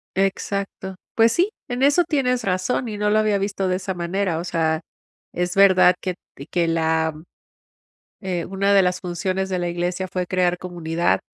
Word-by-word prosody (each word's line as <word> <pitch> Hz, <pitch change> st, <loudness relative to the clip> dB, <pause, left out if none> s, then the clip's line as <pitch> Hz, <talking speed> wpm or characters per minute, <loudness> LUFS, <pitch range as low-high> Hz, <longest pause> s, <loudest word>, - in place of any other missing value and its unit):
Exacto. 195 Hz, 0 st, -2 dB, 0.2 s
Pues 225 Hz, 0 st, +5 dB
sí, 365 Hz, -, +2 dB, 0.2 s
en 245 Hz, +2 st, -1 dB
eso 290 Hz, +5 st, +5 dB
tienes 265 Hz, -6 st, 0 dB
razón, 195 Hz, +6 st, -1 dB
y 210 Hz, -, -5 dB
no 210 Hz, 0 st, +1 dB
lo 215 Hz, +1 st, +3 dB
había 215 Hz, -2 st, +2 dB
visto 195 Hz, -1 st, -2 dB
de 185 Hz, -, +1 dB
esa 190 Hz, 0 st, -4 dB
manera, 175 Hz, 0 st, -1 dB
o 170 Hz, -, -4 dB
sea, 165 Hz, -2 st, 0 dB, 0.5 s
es 180 Hz, +1 st, -2 dB
verdad 185 Hz, -2 st, +6 dB
que 185 Hz, -1 st, -3 dB, 0.2 s
t 140 Hz, +3 st, -10 dB
que 170 Hz, -2 st, +1 dB
la 160 Hz, -1 st, +1 dB, 1.1 s
eh, 180 Hz, -4 st, -2 dB
una 195 Hz, +1 st, +1 dB
de 195 Hz, -, +6 dB
las 180 Hz, 0 st, 0 dB
funciones 185 Hz, +2 st, -2 dB
de 185 Hz, -1 st, -1 dB
la 175 Hz, 0 st, -1 dB
iglesia 175 Hz, +2 st, -2 dB
fue 180 Hz, -1 st, -3 dB
crear 180 Hz, -1 st, +1 dB
comunidad. 170 Hz, -, -1 dB
185 Hz, 180 wpm, -22 LUFS, 175-200 Hz, 1.1 s, verdad